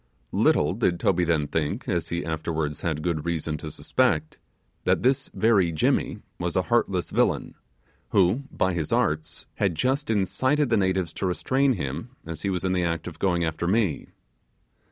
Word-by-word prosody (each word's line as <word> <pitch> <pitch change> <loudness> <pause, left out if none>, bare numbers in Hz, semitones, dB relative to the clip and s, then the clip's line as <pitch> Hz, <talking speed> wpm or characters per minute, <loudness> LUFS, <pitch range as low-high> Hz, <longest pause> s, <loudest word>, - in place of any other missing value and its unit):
Little - - +3
did 85 - 0
Toby 90 -1 +2
then 80 -3 +1
think, 80 - -2
as 85 -4 -1
he 85 -2 -2
afterwards 80 -2 -2
had 80 -3 -2
good 85 -4 -1
reason 80 -2 -2
to 75 - -6
suspect, 75 +1 0 0.4
that - - +2
this 130 +1 +2
very 100 -7 +3
Jimmy 80 - 0 0.2
was - - -2
a - - +2
heartless - - 0
villain, - - +1 0.6
who, 100 +8 +3
by 95 0 +1
his 80 -3 -2
arts, 75 0 0
had 95 -5 +1
just 130 - 0
incited 130 +7 +1
the - - +5
natives 95 -3 0
to 95 - -2
restrain 130 +9 +2
him 85 - -5
as 80 -1 -6
he 100 - -1
was 90 -1 -2
in 95 - +1
the 90 -1 +1
act 85 -1 -1
of 85 -2 -8
going 90 -3 +1
after 80 +1 -2
me. 100 -5 +1
85 Hz, 175 wpm, -25 LUFS, 80-100 Hz, 0.6 s, the